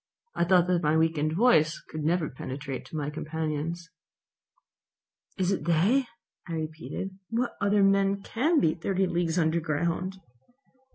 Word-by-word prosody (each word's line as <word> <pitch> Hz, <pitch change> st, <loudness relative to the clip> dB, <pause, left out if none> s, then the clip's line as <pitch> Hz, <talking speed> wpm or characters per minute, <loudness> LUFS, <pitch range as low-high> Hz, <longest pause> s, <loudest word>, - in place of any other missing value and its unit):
I 170 Hz, -, +1 dB
thought 180 Hz, -1 st, +5 dB
that 180 Hz, -1 st, +1 dB
my 155 Hz, -1 st, +2 dB
weakened 160 Hz, -1 st, +1 dB
voice 165 Hz, -6 st, +4 dB
could 155 Hz, -1 st, -5 dB
never 165 Hz, 0 st, +1 dB
penetrate 135 Hz, 0 st, -6 dB
to -, -, -10 dB
my 150 Hz, -1 st, -2 dB
companions. 160 Hz, +2 st, -3 dB, 1.5 s
"It 190 Hz, -, 0 dB
is 195 Hz, -, 0 dB
they," 185 Hz, -, +2 dB, 0.4 s
I 170 Hz, -, -5 dB
repeated. 160 Hz, +4 st, -5 dB
"What 240 Hz, +2 st, -1 dB
other 200 Hz, 0 st, +3 dB
men 195 Hz, 0 st, +3 dB
can 300 Hz, +8 st, +1 dB
be 160 Hz, -, +3 dB
thirty 190 Hz, +3 st, 0 dB
leagues 170 Hz, -1 st, -1 dB
under 165 Hz, 0 st, +2 dB
ground?" 170 Hz, +4 st, -2 dB
170 Hz, 145 wpm, -28 LUFS, 155-195 Hz, 1.5 s, thought